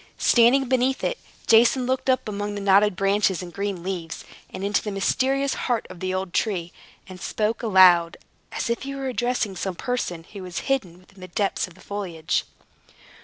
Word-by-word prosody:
Standing 245 +3 +4
beneath 260 +1 +1
it, - - -1 0.3
Jason 235 +3 +5
looked 260 +1 -1
up 260 -3 +2
among 205 0 -3
the 205 - -4
knotted 200 0 +4
branches 195 -1 +1
and 175 -1 -9
green 200 -3 -3
leaves, 175 -3 -5 0.2
and 190 - -7
into 200 0 +1
the 210 - -4
mysterious 265 +7 0
heart 240 -3 -1
of 185 - -11
the 185 +1 -2
old 185 -1 -3
tree, 180 -6 -1 0.3
and 185 -1 -11
spoke 215 +1 -1
aloud, 185 -6 +5 0.3
as - - -3
if 235 0 -1
he 275 0 -5
were 270 -1 -3
addressing 240 -5 -1
some 185 0 -3
person 180 -8 -3
who 200 - -7
was 180 -2 -5
hidden 185 -9 -2
in 190 - -18
the 185 - -8
depths 195 +2 -1
of 175 - -16
the - - -18
foliage. 180 -6 -3
200 Hz, 185 wpm, -24 LUFS, 185-245 Hz, 0.3 s, Jason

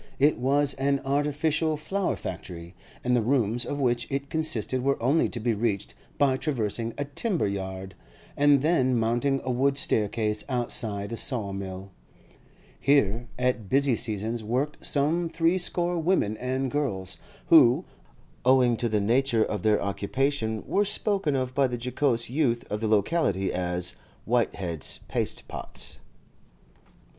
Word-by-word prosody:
It 145 0 +3
was 140 +2 +2
an 140 +1 +2
artificial 150 +3 +1
flower 190 +6 -1
factory, 85 0 -7 0.3
and 125 0 +2
the 120 - +3
rooms 120 -1 +1
of 145 - -3
which 120 -3 +1
it 140 +1 -3
consisted 130 -5 -1
were 140 +2 +1
only 135 +8 +2
to 120 - -4
be 115 +1 +1
reached 105 -2 -1 0.2
by 135 -2 +3
traversing 115 -5 -2
a 145 - -2
timber 165 - -1
yard, 95 -1 -5 0.4
and 145 -1 +4
then 130 -6 +3
mounting 120 +5 +1
a 130 - -1
wooden 135 +3 +2
staircase 105 -4 0
outside 115 -4 -2
a 115 - -4
saw 110 -7 -2
mill. 95 0 -6 0.9
Here 120 -5 +2
at 125 -5 -1
busy 135 -2 +3
seasons 110 +1 -2
worked 130 +7 -2
some 160 +4 +1
threescore 175 +1 +1
women 160 - +1
and 130 +1 -2
girls, 100 -11 -2 0.3
who, - - +6 0.6
owing 125 -2 +4
to 120 - -1
the 105 -1 +1
nature 115 +2 +2
of 105 - -3
their 105 -1 +3
occupation, 110 +3 -1
were 205 - +2
spoken 200 -6 0
of 130 -1 -1
by 135 0 +3
the 125 -1 -3
jocose 125 0 0
youth 125 -3 0
of 105 +1 -2
the 110 - 0
locality 105 - +1
as 90 0 -1 0.3
'Whitehead's 95 - -1
pastepots. - - -3
125 Hz, 140 wpm, -27 LUFS, 110-140 Hz, 0.9 s, who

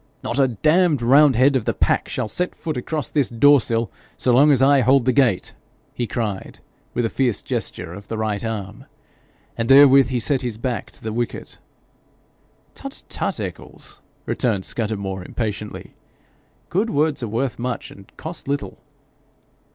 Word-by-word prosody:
'Not 120 - -2
a 135 - +5
damned 150 - +2
roundhead 135 +1 +5
of 125 - 0
the - - -1
pack - - +1
shall - - -2
set 180 +11 -2
foot 160 -3 -4
across 150 +4 -3
this 145 -4 +1
door 140 +4 +5
sill, 115 -1 -1 0.3
so 125 - +2
long 145 +5 +6
as 135 - +4
I 135 +1 +5
hold 130 +1 +4
the 130 - +3
gate,' 120 -10 +2 0.4
he 120 - -3
cried, 110 -6 -4 0.4
with 120 - +1
a - - 0
fierce 125 -6 0
gesture 80 - -4
of 100 +2 -11
the 115 - -4
right 110 -1 -2
arm. 110 -4 -5 0.7
And 115 0 -2
therewith 135 -1 +7
he 125 -1 -1
set 130 +3 0
his 120 -4 -4
back 120 +1 -3
to - - -15
the 110 -1 -4
wicket. 120 +1 -4 1.1
'Tut, - - -9
tut, - - -3
Eccles - - -8
!' - - -39
returned 105 -7 -1
Scudamore 100 -4 -3
impatiently. 105 0 -5 0.8
'Good 205 +6 +1
words 150 -3 0
are 120 - -3
worth 120 +4 -2
much, 125 0 -4
and 100 0 -15
cost 160 -1 -7
little.' 140 0 -3
125 Hz, 165 wpm, -21 LUFS, 110-140 Hz, 1.1 s, therewith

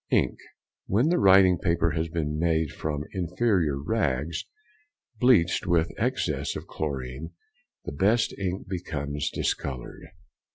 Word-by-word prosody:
Ink.—When 115 +11 -1
the 175 - +2
writing 95 -3 +6
paper 85 -1 +1
has 80 +1 -2
been 75 -2 -2
made 80 -2 +1
from 75 -2 -3
inferior 90 -4 0
rags 70 +3 -1 0.7
bleached 100 -8 +3
with 85 -2 +2
excess - - -1
of - - -6
chlorine 70 -1 -5 0.5
the - - -4
best 110 +4 +2
ink 95 0 -3
becomes 75 -6 -3
discoloured. 65 -3 -4
85 Hz, 115 wpm, -26 LUFS, 75-95 Hz, 0.7 s, writing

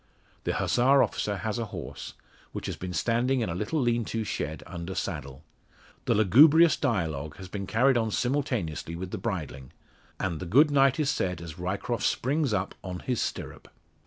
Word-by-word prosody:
The - - 0
Hussar 135 +3 +4
officer 105 -1 -2
has 110 +4 -3
a 115 - -1
horse, 95 -7 -8 0.4
which - - -5
has - - -3
been 90 0 -6
standing 120 +9 +1
in 110 - -1
a - - -2
little 105 - -2
lean 120 -2 +1
to 115 +1 -2
shed, 80 -6 -4
under 85 +1 -6
saddle. 75 -6 -5 0.6
The - - +2
lugubrious 145 - +6
dialogue 80 - -2
has 95 -1 -9
been 100 +1 -5
carried 125 +3 +3
on 110 -1 +1
simultaneously 115 - -1
with 90 +2 -6
the 110 - -4
bridling, 80 - -5 0.5
and 85 -5 -2
the 90 - -5
"Good 145 - +5
night" 135 -1 +4
is 150 -3 +2
said 90 -3 -1
as 85 0 -9
Ryecroft 100 +6 -2
springs 140 +1 +1
up 100 -2 -1
on 90 -1 -5
his 125 -4 -1
stirrup. - - -5
105 Hz, 180 wpm, -27 LUFS, 90-125 Hz, 0.6 s, lugubrious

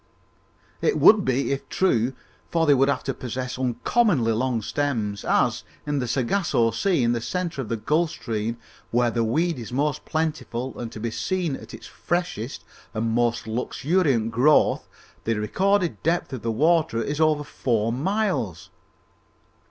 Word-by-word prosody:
"It 450 - +2
would 215 -2 +7
be, 130 -1 0
if 140 - -3
true, 130 -9 +1 0.4
for 165 -1 +2
they 145 - +6
would 135 +1 +3
have 140 - 0
to 135 - -2
possess 125 +1 -5
uncommonly 130 - +2
long 115 0 0
stems, 110 -9 -2
as, - - +1 0.2
in 145 -1 -1
the 125 - -2
Sagossa 125 - +1
Sea, 180 -10 +1
in 120 - +3
the 120 -1 -1
centre 170 +1 -3
of 115 - -7
the 115 - -1
Gulf 155 +9 +1
Stream, 115 -6 -3 0.3
where 120 0 +2
the 115 0 0
weed 160 +7 0
is 115 -2 -7
most 140 +3 0
plentiful 155 -6 -2
and 115 -2 -5
to - - -8
be 115 +1 -3
seen 175 +1 -1
at - - -10
its - - -12
freshest 175 -9 -3 0.3
and 110 +1 0
most 120 0 +1
luxuriant 125 +1 0
growth, 130 +7 +3 0.3
the 115 - 0
recorded 185 - +1
depth 170 -3 0
of 130 - -4
the 115 - -1
water 155 +1 +2
is 150 +2 -2
over 155 -2 +3
four 115 -5 -1
miles!" 175 - -1
130 Hz, 160 wpm, -24 LUFS, 115-160 Hz, 0.4 s, would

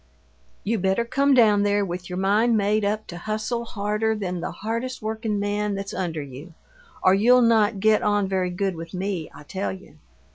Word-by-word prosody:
"You 220 +1 0
better 190 +5 +1
come 275 +3 +2
down 215 -4 +5
there 205 0 +2
with 180 0 -6
your 180 - -4
mind 215 +5 +3
made 210 +1 +1
up 210 +1 -1
to 175 - -8
hustle 215 +4 -3
harder 210 0 -1
than 180 -4 -3
the - - -3
hardest 230 +4 -4
workin' 220 -1 -2
man 205 0 -1
that's 195 0 -5
under 165 -5 -3
you, 140 +5 -11 0.5
or 185 - +6
you'll 245 +5 +5
not 220 -3 +3
get 215 +1 +4
on 205 -1 +1
very 190 -1 0
good 190 +2 -1
with 165 +2 -8
me, 185 -3 -3
I - - -13
tell 190 +6 -3
you! 190 -5 -12
205 Hz, 190 wpm, -24 LUFS, 190-220 Hz, 0.5 s, or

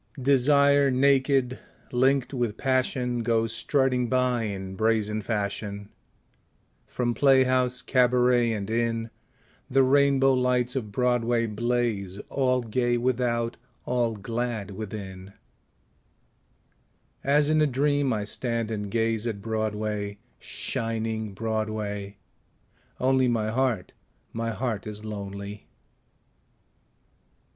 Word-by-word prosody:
Desire 140 +1 +4
naked, 135 -1 +2 0.3
linked 130 +2 +2
with 120 -5 -1
Passion, 130 -2 0
Goes 115 -1 +1
strutting 125 0 +1
by 125 -2 +1
in 95 -2 -5
brazen 110 0 +1
fashion; 100 -1 -3 1.0
From 120 -1 -1
playhouse, 130 -2 +3
cabaret 125 -1 +3
and 105 -3 -3
inn 115 0 -1 0.6
The 135 +1 +4
rainbow 135 0 +4
lights 125 -1 +1
of 110 -6 -3
Broadway 120 0 +1
blaze 110 -3 -1
All 130 -2 +1
gay 120 +1 0
without, 120 -1 0 0.3
all 120 -2 0
glad 115 -1 -3
within; 95 -2 -7 1.9
As 145 +2 +3
in 155 0 +3
a 150 - +4
dream 145 +1 +1
I 105 -3 -1
stand 115 +1 -3
and 105 -2 -3
gaze 115 +1 0
At 110 -3 -3
Broadway, 105 -1 -3 0.2
shining 110 -2 -3
Broadway 110 -2 -3 0.8
only 130 0 +3
My 110 -3 0
heart, 120 -6 0 0.4
my 115 0 -2
heart 115 -3 -3
is 105 0 -7
lonely. 100 -1 -7
115 Hz, 100 wpm, -26 LUFS, 110-130 Hz, 1.9 s, Desire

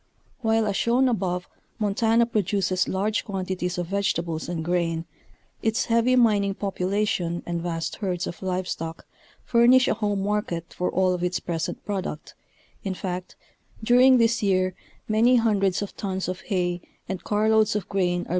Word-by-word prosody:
While 225 -2 +2
as 205 -2 -1
shown 245 +4 +3
above 180 -6 -1 0.3
Montana 225 +2 +2
produces 195 -4 0
large 210 +3 0
quantities 185 -2 -3
of 175 - -1
vegetables 170 -4 -1
and 165 -2 -3
grain, 170 -2 0 0.6
its 225 +1 +1
heavy 235 +2 +3
mining 205 -5 +3
population 190 -3 -1
and 170 -1 -3
vast 165 -1 -3
herds 180 -4 -2
of 170 - -7
live 185 -1 -2
stock 165 -1 -5 0.4
furnish 245 +2 +5
a - - +3
home 205 -3 -1
market 200 -5 -2
for 180 - -1
all 185 -1 +2
of 180 -1 -3
its 180 0 0
present 165 -2 -4
product, 190 -6 -4 0.5
in 190 -2 -2
fact, 180 -1 -5 0.5
during 250 +3 +6
this 230 0 +2
year 185 -2 +2 0.3
many 225 +4 +4
hundreds 205 -5 +2
of 200 - -8
tons 190 -2 -3
of 185 0 -4
hay 175 -3 -1 0.3
and 185 -2 -5
car 210 +3 +1
loads 220 -1 +3
of 205 -4 -2
grain 175 -2 0
are. - - -15
195 Hz, 160 wpm, -25 LUFS, 180-220 Hz, 0.6 s, during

